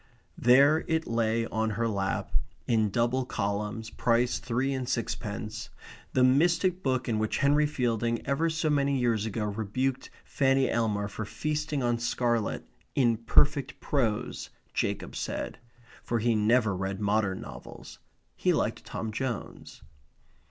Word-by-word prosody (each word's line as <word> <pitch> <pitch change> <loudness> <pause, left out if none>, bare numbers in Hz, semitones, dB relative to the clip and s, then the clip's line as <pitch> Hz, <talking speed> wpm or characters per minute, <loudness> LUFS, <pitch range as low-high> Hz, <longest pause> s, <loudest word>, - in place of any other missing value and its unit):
There 140 +6 +6
it 160 0 0
lay 115 0 +1
on 110 -1 -1
her 115 0 +1
lap, 100 -3 -2 0.3
in 110 -3 +2
double 120 +5 +1
columns, 105 0 -3
price 120 0 +1
three 125 +3 -1
and 130 -2 -3
sixpence; 110 -2 -3 0.4
the 130 - +4
mystic 170 +7 +3
book 130 -4 0
in 110 -3 0
which 110 0 0
Henry 145 +2 +3
Fielding 120 -4 -1
ever 155 +4 +1
so 160 -1 0
many 140 -1 +2
years 115 -4 +1
ago 105 0 -2
rebuked 110 +6 -2 0.2
Fanny 135 -1 +2
Elmer 105 -3 0
for 110 +1 -5
feasting 150 +4 -2
on 120 -1 +1
scarlet, 120 -2 -1 0.3
in 120 -4 +3
perfect 140 +5 +2
prose, 115 -7 -1 0.2
Jacob - - -2
said. - - -4 0.4
For 120 - -1
he 115 +1 +2
never 110 -1 +3
read 95 +1 -3
modern 100 -2 +1
novels. 65 -4 -10 0.4
He - - +2
liked - - -1
Tom 110 -1 -5
Jones. 120 0 -5
120 Hz, 140 wpm, -28 LUFS, 110-135 Hz, 0.4 s, There